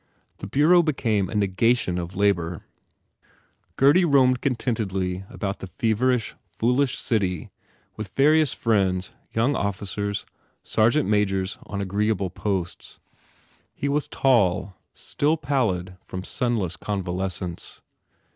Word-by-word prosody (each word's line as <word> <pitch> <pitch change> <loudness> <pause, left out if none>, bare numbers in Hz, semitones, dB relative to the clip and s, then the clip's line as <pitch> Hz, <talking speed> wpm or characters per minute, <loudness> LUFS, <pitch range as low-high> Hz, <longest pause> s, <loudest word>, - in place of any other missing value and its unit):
The - - -6
bureau 155 - +5
became 115 - 0
a - - -6
negation 100 -1 +1
of 85 +2 -6
labour. 90 -4 0 1.1
Gurdy 145 +7 +5
roamed 130 -5 +4
contentedly 100 -8 -1
about 100 -1 -4
the 95 - -7
feverish, 115 +5 0 0.2
foolish 125 +3 +1
city 95 - -1 0.5
with 110 -1 -5
various 150 +6 +3
friends 95 -5 0 0.2
young 120 +6 +1
officers, 100 +1 -3 0.4
sergeant 115 +7 +2
majors 100 -2 0
on 100 -1 -4
agreeable 100 -1 0
posts. 95 -3 -4 0.8
He 140 - -2
was 145 +1 0
tall, 100 -7 +2 0.2
still 150 +3 0
pallid 110 - -1
from 95 0 -6
sunless 105 -7 -1
convalescence. 90 -3 -4
105 Hz, 110 wpm, -24 LUFS, 95-125 Hz, 1.1 s, bureau